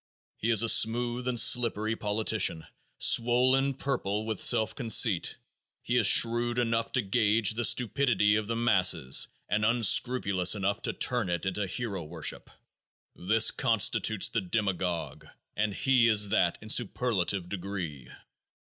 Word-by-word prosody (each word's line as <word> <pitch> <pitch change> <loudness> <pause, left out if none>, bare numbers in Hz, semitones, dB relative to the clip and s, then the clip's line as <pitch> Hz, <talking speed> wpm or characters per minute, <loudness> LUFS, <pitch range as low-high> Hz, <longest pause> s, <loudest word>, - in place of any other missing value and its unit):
He 115 - -4
is 115 -1 +4
a - - 0
smooth 120 +3 +1
and 125 -2 +1
slippery 115 -2 +2
politician, 105 -6 -1 0.3
swollen 130 +3 +2
purple 110 -7 -3
with 110 -3 -4
self 110 -3 +2
conceit; 110 -6 +1 0.5
he 120 - -2
is 115 -5 +3
shrewd 120 +1 +2
enough 115 -1 -1
to 130 - 0
gauge 105 +1 +1
the 115 +2 -3
stupidity 120 -3 +2
of 110 -1 -2
the 115 - -3
masses 95 - +1 0.2
and 105 0 -1
unscrupulous 110 -4 +1
enough 100 0 -2
to - - -2
turn 120 -7 -2
it 85 +2 -3
into 95 +1 -3
hero 100 -2 -5
worship. 80 0 -5 0.7
This 110 +5 +2
constitutes 110 -1 +1
the 115 - -2
demagogue, 90 -4 -3 0.3
and 105 +1 -1
he 125 +3 +2
is 105 -2 +3
that 90 -5 +1
in 110 - -6
superlative 100 -6 -1
degree. 90 -9 -7
110 Hz, 140 wpm, -28 LUFS, 95-120 Hz, 0.7 s, is